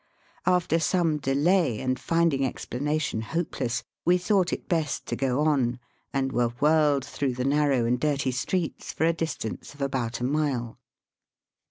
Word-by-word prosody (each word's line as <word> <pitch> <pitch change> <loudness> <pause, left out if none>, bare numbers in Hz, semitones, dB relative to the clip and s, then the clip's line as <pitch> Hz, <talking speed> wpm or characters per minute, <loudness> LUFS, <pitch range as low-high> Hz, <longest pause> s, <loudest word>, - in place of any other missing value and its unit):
After 180 -2 +3
some 165 -2 +1
delay, 145 - +2
and 130 -1 -1
finding 165 -2 +2
explanation 135 0 -2
hopeless, 125 -3 -2 0.2
we 180 +1 +4
thought 185 0 +2
it - - -4
best 160 -4 -1
to - - -3
go 135 +1 0
on, 135 -6 +2 0.3
and 135 -1 0
were 120 -1 0
whirled 150 -3 +3
through 140 -2 -2
the 125 +1 -2
narrow 140 -3 +2
and 120 +1 +1
dirty 140 -2 0
streets 160 +7 -2
for 160 - 0
a 165 - +3
distance 160 -6 -4
of 145 - -12
about 125 -4 -2
a - - -4
mile. 130 -4 -1
140 Hz, 155 wpm, -26 LUFS, 125-160 Hz, 0.3 s, we